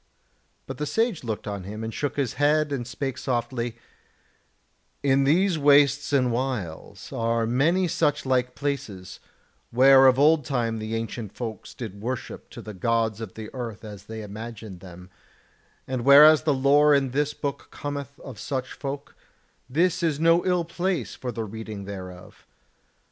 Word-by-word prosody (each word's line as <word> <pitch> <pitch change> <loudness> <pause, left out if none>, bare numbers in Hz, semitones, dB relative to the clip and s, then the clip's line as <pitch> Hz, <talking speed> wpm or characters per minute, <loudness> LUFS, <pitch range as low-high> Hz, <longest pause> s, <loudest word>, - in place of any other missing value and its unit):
But - - -8
the 150 - -2
Sage 225 - 0
looked 110 -3 -4
on 100 -2 -4
him 105 +4 -7
and 110 0 -4
shook 145 -2 -2
his 135 -5 -1
head 150 0 +3
and 125 -4 -3
spake 130 0 -4
softly: 120 -2 -2 1.3
"In 135 0 +3
these 175 +3 +3
wastes 145 0 +4
and 130 -3 +2
wilds 115 -10 -4
are 115 0 0
many 160 +11 +2
such 150 -4 0
like 125 -1 0
places, 130 -10 -4 0.5
where 135 +2 +7
of 130 0 +5
old 150 +2 +5
time 120 -4 -1
the 110 +1 -4
ancient 115 -2 -5
folks 115 -3 -7
did 100 -5 -7
worship 125 +3 -5
to - - -10
the 105 - -8
Gods 115 +2 0
of 110 -5 -7
the 110 -1 -8
Earth 115 -4 -6
as 105 -2 -10
they 110 0 -7
imagined 110 -2 -8
them: 90 0 -12 0.7
and 130 -2 -3
whereas 150 +3 +8
the 155 - +3
lore 145 +2 +5
in 135 -2 +1
this 145 +2 0
book 140 -2 -4
cometh 140 -1 -6
of 125 -6 -10
such 130 +1 -4
folk, 140 0 -6 0.6
this 170 +6 +1
is 160 -4 0
no 165 +2 +4
ill 180 -2 +2
place 175 - -2
for 125 - -5
the 115 -1 -4
reading 110 -1 -7
thereof. 90 -2 -10
130 Hz, 160 wpm, -25 LUFS, 110-145 Hz, 1.3 s, whereas